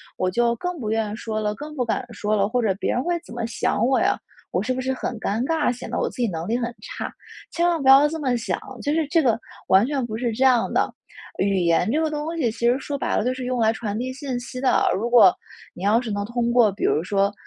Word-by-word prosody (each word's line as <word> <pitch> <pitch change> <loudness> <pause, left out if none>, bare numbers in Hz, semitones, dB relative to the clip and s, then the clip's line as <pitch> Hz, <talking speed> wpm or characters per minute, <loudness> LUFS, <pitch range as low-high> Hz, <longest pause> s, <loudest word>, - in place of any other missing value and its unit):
我 185 0 -1
就 235 +2 +2
更 355 +5 -4
不 215 - -3
愿 220 -1 0
意 - - -4
说 215 -2 -3
了， 210 0 -1
更 300 +1 -8
不 255 - 0
敢 245 +2 -2
说 210 0 -2
了， 200 - +2
或 245 +3 0
者 205 -4 +2
别 195 - -2
人 245 - 0
会 345 +1 0
怎 - - -11
么 235 -1 -3
想 235 0 0
我 260 0 +3
呀， - - +2 0.3
我 - - 0
是 255 - 0
不 260 - -4
是 260 +1 -1
很 240 -2 -4
尴 220 +3 -1
尬， 320 +1 +1
显 245 - -8
得 - - -1
我 - - 0
自 - - -14
己 235 - +2
能 165 0 -4
力 230 +3 +1
很 240 -1 -2
差。” - - -6 0.4
千 340 +1 +1
万 335 -4 +1
不 265 - +4
要 275 +2 +8
这 320 +2 -4
么 255 -4 +1
想。 225 - -2 0.2
就 290 +1 0
是 320 -1 +1
这 330 +1 +3
个， 235 -6 +2 0.3
完 190 +4 +5
全 270 -3 -1
不 220 -1 -5
是 240 -1 -1
这 255 +5 0
样 250 -3 +3
的， - - +2 0.5
语 195 0 +2
言 175 +2 +2
这 310 - +1
个 320 - +1
东 305 +2 -3
西 250 -7 +1
其 - - -12
实 245 - +2
说 285 +1 -4
白 - - -1
了 - - +1
就 250 - +1
是 255 0 -6
用 250 0 -1
来 220 -1 +4
传 210 -2 -4
递 255 +1 -3
信 265 -2 -4
息 250 +1 -7
的， 265 - +3
如 225 +5 -1
果， 230 -7 +7 0.4
你 180 - -9
要 210 +4 +4
是 245 - -5
能 205 0 -2
通 235 +1 -1
过 235 -4 +5
比 200 - -7
如 155 - +2
说， 200 +2 +1
240 Hz, 300 characters per minute, -23 LUFS, 215-265 Hz, 0.5 s, 要